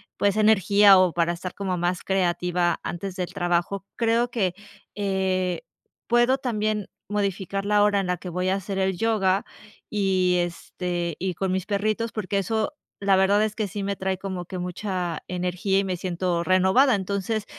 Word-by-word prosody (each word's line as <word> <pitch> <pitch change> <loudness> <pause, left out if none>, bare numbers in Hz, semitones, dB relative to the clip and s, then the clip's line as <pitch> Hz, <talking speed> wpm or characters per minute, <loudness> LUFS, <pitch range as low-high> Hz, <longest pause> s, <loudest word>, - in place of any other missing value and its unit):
pues, 205 +1 +1
energía 205 -2 +6
o 185 -2 +4
para 170 0 +1
estar 180 +1 -6
como 190 -2 -2
más 175 +1 -1
creativa 180 -2 +1
antes 185 +2 -5
del 180 -2 -3
trabajo, 175 +3 0
creo 230 +1 +2
que, 200 -7 0 0.4
eh, 190 -3 0 0.5
puedo 240 +2 +4
también 215 -5 -1 0.2
modificar 195 -1 -2
la 205 0 +4
hora 205 -1 +3
en 195 - -2
la 180 - +1
que 180 +1 -8
voy 180 +2 -2
a 190 - +2
hacer 195 0 -4
el 190 -1 0
yoga 200 -3 +2 0.5
y, 185 -3 +2
este, 175 0 -4
y 185 0 -1
con 190 +2 -2
mis 190 -1 -1
perritos, 215 +3 -1
porque 205 -2 -2
eso, 215 +3 0 0.3
la 195 -1 +4
verdad, 200 +2 +4
es 215 -1 -2
que 215 -2 -1
sí 200 +1 -5
me 200 0 -2
trae 190 0 -1
como 185 -2 -5
que 185 - -6
mucha 180 -2 -3
energía 180 +2 0
y - - +1
me 185 -2 -2
siento 175 -1 -1
renovada. 190 +8 +4
Entonces, 200 +2 -2
190 Hz, 175 wpm, -25 LUFS, 180-205 Hz, 0.5 s, energía